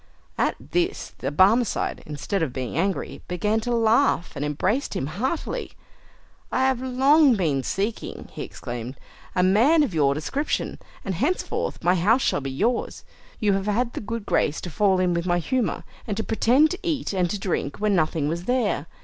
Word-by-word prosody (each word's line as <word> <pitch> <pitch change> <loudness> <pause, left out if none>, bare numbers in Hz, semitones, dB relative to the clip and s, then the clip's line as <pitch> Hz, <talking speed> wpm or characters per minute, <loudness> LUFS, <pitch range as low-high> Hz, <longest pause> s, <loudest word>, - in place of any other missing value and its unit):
At - - +1 0.2
this 355 +2 -1
the - - -2
Barmecide, 205 +9 +2
instead 150 +6 -3
of 160 -5 0
being 130 -2 -4
angry, 190 +3 -1
began 210 +5 0
to 245 +2 -3
laugh, 225 -4 +2
and 140 - -3
embraced 185 - -1
him - - -1
heartily. 245 - -3 0.8
"I - - +1
have 265 -2 +2
long 265 +2 +4
been 155 -9 +1
seeking," 200 - -3
he - - -7
exclaimed, 120 +2 -6 0.4
"a 180 - +3
man 240 - +5
of 260 - -2
your 140 -3 +3
description, 275 - -2 0.3
and 195 - -1
henceforth 350 - -2
my 180 - +4
house 210 +9 +3
shall 145 - +1
be 135 - -4
yours. 225 - -1 0.3
You 205 -2 +2
have 195 +1 -1
had 235 +3 0
the - - -4
good 230 0 -5
grace 155 - +1
to 175 - -6
fall 190 +1 +2
in 180 -1 +2
with 170 +1 -1
my 175 0 +2
humour, 245 +7 -1 0.2
and 205 -2 -2
to 220 - -1
pretend 255 +7 +3
to 370 - -4
eat 315 - -2
and 180 -2 +1
to 205 - -2
drink 175 -7 -2
when 210 0 +1
nothing 155 -3 +1
was 170 +3 -3
there. 240 - 0
200 Hz, 185 wpm, -24 LUFS, 170-245 Hz, 0.8 s, man